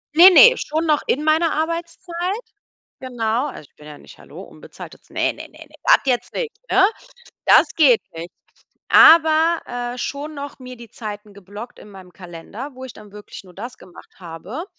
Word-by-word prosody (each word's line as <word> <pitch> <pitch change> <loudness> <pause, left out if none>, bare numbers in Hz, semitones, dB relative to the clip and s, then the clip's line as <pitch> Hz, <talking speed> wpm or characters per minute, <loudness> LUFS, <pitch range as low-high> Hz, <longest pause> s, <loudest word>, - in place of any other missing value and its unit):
Ne, 355 +3 +9
ne, - - +7
schon 315 +2 -3
noch 300 -2 +1
in 295 +4 -1
meiner 315 +1 +1
Arbeitszeit. 340 +4 -4 0.6
Genau. 245 0 -2
Also 250 - -10
ich - - -47
bin 150 - -16
ja 150 -1 -11
nicht - - -17
hallo, - - -13
unbezahltes - - -14
Ne, - - -1
ne, - - -12 0.4
das - - +5
jetzt 250 -3 -2
nicht, 470 -3 -4 0.2
ne? 385 0 +4 0.6
Das - - +4
geht 275 -8 +4
nicht. 170 +2 -8 0.6
Aber, 320 +1 +5
äh, 245 0 -6
schon 290 +4 -6
noch 280 -1 -8
mir 255 -1 -11
die 235 -1 -13
Zeiten 210 -2 -9
geblockt 205 +4 -11
in 210 - -15
meinem 185 -2 -15
Kalender, 185 - -10
wo 260 0 -10
ich 255 - -10
dann 205 -1 -16
wirklich 210 -1 -12
nur 180 -1 -18
das 240 +5 -9
gemacht 180 -1 -17
habe 185 - -8
255 Hz, 175 wpm, -20 LUFS, 210-320 Hz, 0.6 s, Ne